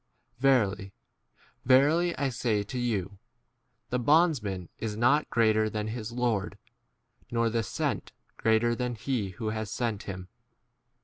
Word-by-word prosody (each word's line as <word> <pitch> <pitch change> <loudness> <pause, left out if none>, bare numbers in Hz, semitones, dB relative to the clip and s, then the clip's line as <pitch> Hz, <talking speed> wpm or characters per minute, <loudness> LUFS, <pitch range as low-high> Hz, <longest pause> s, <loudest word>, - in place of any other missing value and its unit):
Verily, 105 -7 +2 0.7
verily, 150 +7 +4
I 140 -2 0
say 115 -4 0
to 125 +5 -5
you, 100 -5 -2 0.7
The 125 - +1
bondsman 120 - +2
is 105 -2 -3
not 130 +7 +3
greater 110 -1 +3
than 105 0 -3
his 110 0 -5
lord, 120 -5 -1 0.7
nor 115 -1 +1
the 115 0 +1
sent 100 - -2
k - - -16 0.2
greater 115 +1 +2
than 125 0 -2
he 110 -3 -2
who 110 +3 -4
17 110 - -3
has 110 -1 -5
sent 115 -5 -2
him. 95 -1 -6
115 Hz, 140 wpm, -28 LUFS, 105-125 Hz, 0.7 s, verily